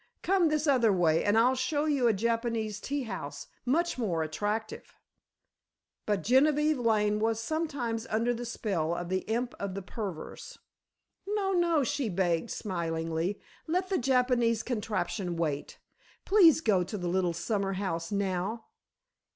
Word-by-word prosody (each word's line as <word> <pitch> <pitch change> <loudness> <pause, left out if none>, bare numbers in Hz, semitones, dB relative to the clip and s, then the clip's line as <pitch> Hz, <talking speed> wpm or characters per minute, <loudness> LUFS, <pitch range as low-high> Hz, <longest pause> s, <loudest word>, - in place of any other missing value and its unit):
Come 375 -2 +3
this 305 0 0
other 250 -7 +4
way, 165 -4 +3
and 205 +2 +3
I'll 245 +3 +5
show 275 +4 0
you 280 -5 +2
a - - +5
Japanese 225 0 -1
tea 280 +5 -3
house, 230 - -6 0.2
much 335 +2 +1
more 175 -9 0
attractive." 205 +8 -4 1.1
But 205 -3 0
Genevieve 295 +4 +3
Lane 210 -3 +2
was 225 0 +1
sometimes 255 -6 -2
under 230 +3 +1
the 240 +1 -5
spell 190 -9 -2
of 175 0 -5
the 185 0 +1
Imp 240 +2 -1
of 200 -2 -4
the 195 - -5
Perverse. 190 -5 -7 0.7
"No, 405 -1 0
no," 340 -5 +2
she 255 -1 -1
begged, 175 +1 0
smilingly, 165 0 -2 0.3
"let 365 +3 0
the 385 - +1
Japanese 250 -3 +2
contraption 205 -5 -2
wait; 150 -4 -2 0.5
please 350 -6 +6
go 200 - +3
to 210 +4 -5
the 180 -2 -3
little 180 -1 +1
summer 195 +3 -1
house 185 -3 -3
now. 200 +2 -2
225 Hz, 145 wpm, -29 LUFS, 190-260 Hz, 1.1 s, please